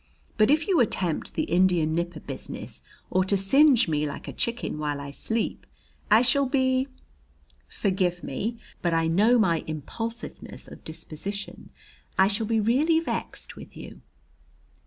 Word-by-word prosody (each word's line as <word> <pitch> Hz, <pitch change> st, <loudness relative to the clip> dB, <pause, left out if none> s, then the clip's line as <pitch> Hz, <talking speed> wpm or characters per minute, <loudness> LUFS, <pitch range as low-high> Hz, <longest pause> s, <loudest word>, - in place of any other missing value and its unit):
But 215 Hz, +1 st, +4 dB
if 300 Hz, +2 st, +3 dB
you 370 Hz, -5 st, +3 dB
attempt 185 Hz, -8 st, 0 dB
the -, -, +1 dB
Indian 175 Hz, -3 st, +2 dB
nipper 170 Hz, -1 st, -2 dB
business, -, -, -7 dB, 0.3 s
or 185 Hz, 0 st, +3 dB
to 200 Hz, +1 st, +2 dB
singe 255 Hz, +5 st, +5 dB
me 150 Hz, -1 st, 0 dB
like 140 Hz, -, -7 dB
a -, -, -5 dB
chicken 235 Hz, -9 st, -2 dB
while 145 Hz, -1 st, -2 dB
I 140 Hz, 0 st, -6 dB
sleep, 220 Hz, +9 st, -2 dB, 0.4 s
I 220 Hz, +3 st, +6 dB
shall 275 Hz, +2 st, +3 dB
be 260 Hz, 0 st, +2 dB, 0.8 s
forgive 185 Hz, -3 st, -1 dB
me, 225 Hz, -, -3 dB, 0.2 s
but 170 Hz, -2 st, +1 dB
I 165 Hz, 0 st, +2 dB
know 205 Hz, +9 st, +4 dB
my 170 Hz, -8 st, +2 dB
impulsiveness 225 Hz, +10 st, -6 dB
of -, -, -12 dB
disposition 165 Hz, +5 st, -6 dB, 0.5 s
I 190 Hz, -, +6 dB
shall 215 Hz, +1 st, -1 dB
be 225 Hz, 0 st, +2 dB
really 280 Hz, +10 st, +3 dB
vexed 330 Hz, -, -4 dB
with -, -, -12 dB
you." -, -, -10 dB
200 Hz, 150 wpm, -26 LUFS, 165-240 Hz, 0.8 s, I